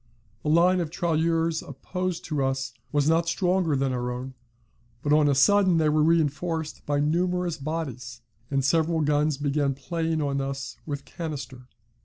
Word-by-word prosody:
The 150 - -2
line 175 +4 +4
of 170 -3 -2
tirailleurs 165 -1 0
opposed 180 +5 -4
to 145 -3 -1
us 135 -1 -1 0.2
was 145 -1 +2
not 165 +1 +3
stronger 180 -3 +1
than 135 -1 0
our 125 0 -2
own, 125 +2 -5 0.7
but 145 - +2
on 150 -1 +5
a 140 - +3
sudden 190 +4 +4
they 155 -1 +3
were 155 0 +2
reinforced 160 0 0
by 145 -1 +1
numerous 175 +2 0
bodies, 130 -6 -5 0.3
and 135 -2 0
several 165 +1 +2
guns 150 0 +1
began 140 -1 0
playing 160 +3 -2
on 140 -2 0
us 135 -2 -4
with 145 -2 -4
canister. 135 -6 -7
150 Hz, 160 wpm, -26 LUFS, 140-165 Hz, 0.7 s, on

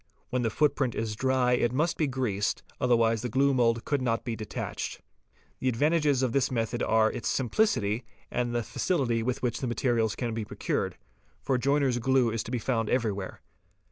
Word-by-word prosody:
When 125 0 +1
the 115 - +1
footprint 135 0 +1
is 110 -1 -2
dry 130 +1 +2
it 120 -1 +2
must 155 +6 +1
be 155 - +1
greased, 125 -7 -1 0.2
otherwise 115 -3 +3
the 125 - -3
glue 135 +4 +3
mould 115 -2 +2
could 145 -3 0
not 115 -2 0
be 120 -2 -3
detatched. 110 -1 -5 0.6
The 130 - +1
advantages 145 +1 +2
of 130 - +1
this 135 +2 +2
method 120 0 -1
are 110 0 +3
its 100 -5 -3
simplicity 120 - +1 0.3
and 120 -1 -1
the 120 - 0
facility 120 - 0
with 125 +2 -2
which 120 -2 0
the 130 - -2
materials 120 -3 +1
can 120 -3 -3
be 115 0 -2
procured, 105 - -2 0.5
for 130 -2 +1
joiner's 135 -1 +2
glue 130 -1 +3
is 115 0 -1
to - - -7
be 125 - 0
found 115 -1 -1
everywhere. 105 -6 -1
120 Hz, 185 wpm, -28 LUFS, 115-130 Hz, 0.6 s, otherwise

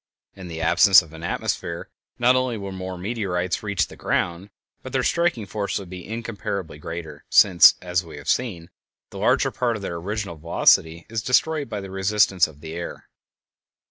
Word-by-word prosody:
In 95 -2 -9
the 80 -1 -6
absence 85 +3 +6
of 80 0 -16
an 80 - -10
atmosphere 85 0 -3 0.3
not 125 +1 +4
only 130 -2 0
would 100 -1 -6
more 95 0 -6
meteorites 95 -3 -2
reach 100 -3 0
the - - -13
ground, 90 +3 -2 0.3
but - - -9
their - - +1
striking 170 - +1
force 100 +1 -3
would 95 -3 -8
be 90 -2 -8
incomparably 105 -7 -5
greater, 80 +1 -7
since, 95 -4 +7
as 90 0 0
we 80 -3 -11
have 70 - -11
seen, 90 -10 -1 0.4
the - - -8
larger - - +2
part 120 -2 -1
of 105 - -7
their 85 -3 -4
original 100 0 -4
velocity 80 +1 +2
is 115 0 -3
destroyed 145 +4 +1
by 105 - -4
the 95 -1 -9
resistance 95 -2 +2
of 75 -2 -16
the 80 +1 -8
air. 85 0 -7
95 Hz, 180 wpm, -23 LUFS, 85-105 Hz, 0.4 s, since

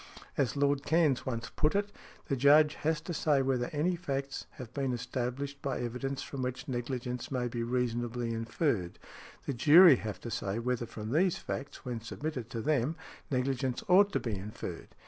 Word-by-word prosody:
As 135 -3 0
Lord 140 0 +2
Cairns 155 -5 +2
once 115 -1 -3
put 155 +4 +2
it, 205 0 0 0.3
"The 140 - 0
Judge 145 +3 +6
has 160 0 -1
to 175 - -5
say 145 -3 +2
whether 130 -2 0
any 160 +4 +1
facts 140 -5 -4
have 125 -2 -9
been 135 -3 -1
established 125 +3 -3
by 140 - -2
evidence 130 +3 -3
from 135 - -6
which 125 0 -3
negligence 125 -1 -3
may 125 -2 -1
be 120 0 -3
reasonably 120 -1 -1
inferred, 115 - -1 0.5
the 140 - -1
jury 150 +4 +8
have 105 -5 -5
to 120 - -6
say 100 0 -2
whether 120 0 -1
from 110 -1 -6
these 175 +5 +3
facts, 140 +1 -6
when 120 -3 -3
submitted 125 0 -5
to 115 - -4
them, 145 +2 +1 0.3
negligence 130 -1 -1
ought 200 +3 +6
to - - +2
be 115 - -3
inferred." 100 +3 -6
130 Hz, 175 wpm, -31 LUFS, 120-145 Hz, 0.5 s, jury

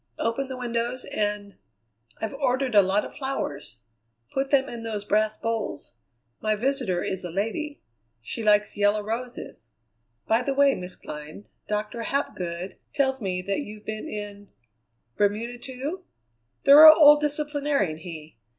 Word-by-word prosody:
open 230 +4 -1
the 260 -1 -6
windows, 240 +1 -2
and 205 -1 -3 0.6
I've 220 +3 -3
ordered 260 -2 0
a 205 - +8
lot 195 +2 +1
of - - -9
flowers. 150 - -4 0.5
Put 270 0 -1
them 275 -1 +3
in 235 -1 -7
those 215 -3 -4
brass 215 +1 +1
bowls. 225 -10 -4 0.5
My 215 0 +1
visitor 245 -6 0
is 190 0 -3
a 175 - -5
lady. 225 - -3 0.4
She 115 - -6
likes 210 -1 +3
yellow 205 +1 +2
roses. 225 - -6 0.6
By 225 +2 +2
the 270 +2 -2
way, 280 0 +5
Miss 180 0 -6
Glynn, 150 +6 -9 0.2
Doctor 210 +2 -3
Hapgood 185 -9 -3 0.2
tells 265 -2 +1
me 180 -2 -2
that 200 +1 -1
you've 215 -5 -10
been 215 0 -5
in 205 -1 -7 0.7
Bermuda, 220 +4 0
too? 275 +9 -5 0.6
Thorough 310 +3 +11
old 295 -2 +7
disciplinarian 290 - -1
he! 160 -6 -10
220 Hz, 140 wpm, -25 LUFS, 200-270 Hz, 0.7 s, Thorough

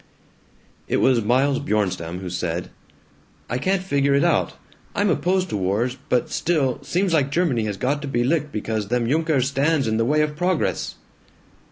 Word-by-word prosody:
It - - +1
was 125 -4 +3
Miles 130 +5 +2
Bjornstam 95 - -2
who 95 - -5
said, 85 -1 -3 0.8
"I 125 - 0
can't 190 +4 0
figure 140 -5 +2
it 140 - +3
out. 170 - +2 0.4
I'm 205 -2 +2
opposed 185 +3 +1
to 105 - -2
wars, 105 +7 0
but 125 - +1
still, 145 -7 0
seems 185 0 0
like 140 -4 +2
Germany 140 -8 +1
has 105 -2 -3
got 140 +6 -1
to 145 - -5
be 120 -3 0
licked 150 +2 0
because 110 -2 -3
them 120 +1 0
Junkers 150 -2 +1
stands 140 -1 +1
in 110 0 0
the 115 - +2
way 150 +4 +2
of 150 0 -1
progress." 180 +1 -1
135 Hz, 175 wpm, -22 LUFS, 110-160 Hz, 0.8 s, was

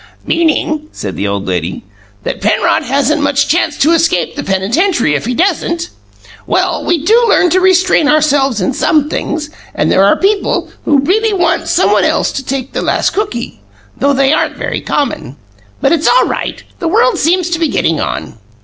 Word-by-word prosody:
"Meaning," 310 -2 0
said 95 -2 -6
the 100 - -2
old 100 0 -3
lady, 90 -1 -3 0.4
"that - - -4
Penrod - - +1
hasn't 280 +4 0
much 285 0 +1
chance 320 -2 0
to 310 - +3
escape 330 +1 +1
the 290 - -3
penitentiary 215 - 0
if 145 - -2
he 250 - -1
doesn't? 340 0 -1 0.6
Well, - - 0
we 330 -3 -1
do 465 +4 +4
learn 355 -4 +3
to 370 - +3
restrain 370 -4 +3
ourselves 285 -6 +2
in 180 - 0
some 300 -3 +1
things; 300 -2 -3 0.2
and - - 0
there 190 - +4
are 200 - +4
people 400 +1 0
who 285 -3 +3
really 425 +9 +1
want 360 -3 0
someone - - +2
else - - +1
to 270 - -5
take 265 0 -4
the - - -2
last - - 0
cookie, 250 - -4 0.3
though 280 +1 +1
they 275 +1 +2
aren't - - -1
very - - -3
common. 275 - -3 0.5
But - - +2
it's 325 -2 +1
all - - +4
right, - - -4 0.2
the 340 - -2
world 255 -6 +2
seems 345 +2 +1
to 335 - -1
be 330 - +1
getting 165 - 0
on." 110 - -4
300 Hz, 185 wpm, -13 LUFS, 255-345 Hz, 0.6 s, do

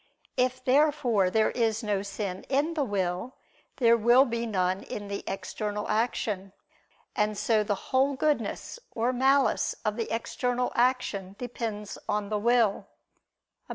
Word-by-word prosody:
If 255 0 0
therefore 260 -8 +3
there 220 +3 +2
is 225 -1 0
no 205 -2 0
sin 195 -2 -5
in 290 +5 +1
the 305 -3 0
will, 195 +1 -2 0.4
there 235 -3 +5
will 240 +4 +5
be 235 -2 -2
none 185 -2 0
in 205 -1 -7
the 200 - -4
external 205 +2 -3
action. 210 -3 -1 0.6
And 210 0 0
so 220 -1 +2
the 205 0 0 0.2
whole 270 +2 +3
goodness 290 - -1
or 235 +3 0
malice 265 -1 +2
of 210 0 0
the 230 - -2
external 245 +2 -1
action 235 -6 0
depends 225 -4 -5
on 210 -1 -1
the 210 -1 0
will. 230 -2 +2 0.8
Obj. - - -38
225 Hz, 145 wpm, -28 LUFS, 205-250 Hz, 0.8 s, there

